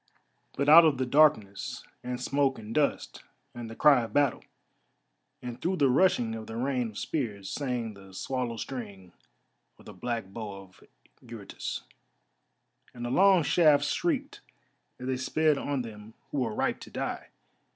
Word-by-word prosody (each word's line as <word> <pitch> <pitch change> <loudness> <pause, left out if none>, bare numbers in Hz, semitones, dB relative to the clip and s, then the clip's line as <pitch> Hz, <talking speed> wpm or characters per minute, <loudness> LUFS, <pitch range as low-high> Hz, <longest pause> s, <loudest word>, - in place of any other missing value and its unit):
But 140 - 0
out 160 +3 +10
of 155 -4 +3
the 130 - 0
darkness 125 -8 +2 0.2
and 125 0 -4
smoke 135 +1 +1
and 110 0 -8
dust, 150 +1 0 0.3
and 120 -2 -7
the 115 - -8
cry 140 -1 +5
of 115 - -6
battle, 145 -4 +2 1.0
and 125 0 -7
through 185 +2 0
the 140 -7 +3
rushing 125 -7 +3
of 110 -1 -7
the 110 - -7
rain 125 -1 -1
of 105 - -11
spears, 105 -10 -3
sang 125 -6 -3
the 95 -1 -14
swallow 125 0 -3
string 100 -9 -7 0.6
of - - -19
the - - -10
black 120 -3 -3
bow 100 +1 -7
of 95 -1 -20 0.4
Eurytus, - - -7 1.1
and 120 0 -6
the 120 - -3
long 190 +2 +5
shafts 145 -2 +4
shrieked 295 -5 -1 0.6
as 125 - -8
they 130 0 -1
sped 150 +3 +1
on 140 -3 -2
them 110 -1 -11 0.2
who 145 - -1
were 115 -4 -1
ripe - - 0
to - - -11
die. - - -4
125 Hz, 160 wpm, -28 LUFS, 110-145 Hz, 1.1 s, out